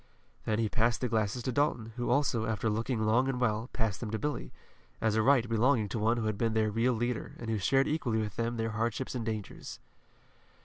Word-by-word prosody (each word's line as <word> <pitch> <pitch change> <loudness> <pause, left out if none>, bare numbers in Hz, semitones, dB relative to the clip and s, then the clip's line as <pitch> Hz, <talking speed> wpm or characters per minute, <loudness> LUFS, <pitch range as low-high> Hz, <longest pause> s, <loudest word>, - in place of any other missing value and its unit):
Then 110 - +1
he 115 -1 +1
passed 115 +2 +1
the 125 - +1
glasses 110 +1 0
to 130 - -1
Dalton, 120 -4 0
who 120 -1 -2
also, 120 -6 +2
after 110 0 0
looking 115 +1 -1
long 120 +5 +3
and 130 -2 -1
well, 115 0 0
passed 110 -5 -1
them 115 - -4
to 110 - -1
Billy, 150 +5 -3 0.5
as 110 -1 +1
a 110 - +3
right 125 0 +4
belonging 115 -1 +2
to 115 - -2
one 115 +3 +2
who 115 - -1
had 110 -2 -1
been 115 -1 +1
their 110 -1 +2
real 115 +4 +2
leader, 120 0 -2
and 115 -1 -4
who 110 - 0
shared 135 +7 +3
equally 140 -7 0
with 105 -2 -3
them 115 +1 -1
their 115 0 -1
hardships 115 +4 -2
and 125 -3 -3
dangers. 110 -3 -5
115 Hz, 225 wpm, -31 LUFS, 110-125 Hz, 0.5 s, right